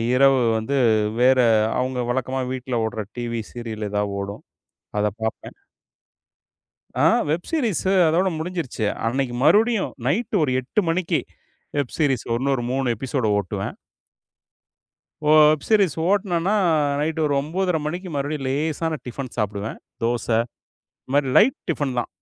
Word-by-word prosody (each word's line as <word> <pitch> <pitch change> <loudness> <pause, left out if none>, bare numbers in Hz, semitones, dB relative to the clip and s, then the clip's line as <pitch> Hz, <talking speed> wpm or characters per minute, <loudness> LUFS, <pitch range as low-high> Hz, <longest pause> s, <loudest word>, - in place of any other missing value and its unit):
இரவு 135 -1 +5 0.2
வந்து, 135 +6 -1 0.4
வேற, 130 +1 +5 0.4
அவுங்க 130 0 -1
வழக்கமா 130 +1 -1
வீட்ல 130 -1 -4
ஓடுற 110 -1 -3
டிவி 115 -1 -3
சீரியல் 110 -3 -5
எதா 105 0 0 0.2
ஓடும். 100 +1 -7 0.6
அதப் 105 +1 -1
பாப்பேன். 110 - -4 1.4
ஆ, - - +3 0.3
வெப் 170 +3 -2
சீரிஸ் 245 - 0 0.3
அதோட 180 +4 +2
முடிஞ்சிருச்சு. 165 -9 -3 0.2
அன்னைக்கு 125 +1 -1
மறுபடியும், 210 - +3
நைட்டு 210 - 0
ஒரு 130 -4 +1
8 130 - 0
மணிக்கு, 165 +1 +1 0.6
வெப் 140 -4 -2
சீரிஸ் 135 -6 +1
இன்னொரு 135 0 0
3 130 -2 0
எப்பிசோடு 130 -1 -1
ஓட்டுவேன். 95 -3 -4 1.5
ஓ - - +3 0.2
வெப் 155 -2 0
சீரிஸ் 200 -8 +3
ஓட்னேன்னா, 190 -2 +1 0.2
அ 145 -2 +1
நைட்டு 160 +2 -1
ஒரு 145 - +1
9.30 175 +5 -1
மணிக்கு 180 +4 -4
மறுபடியும் 140 0 -2
லேசான 155 +3 -1
டிஃபன் 125 +1 -5
சாப்பிடுவேன். 105 0 -3 0.2
தோச, 120 -1 0 0.8
இந்த - - -17
மாரி 145 -2 +3
லைட் 235 +6 +5
டிஃபன் 145 -5 -1
தான். 120 - -1
140 Hz, 130 wpm, -23 LUFS, 120-165 Hz, 1.5 s, இரவு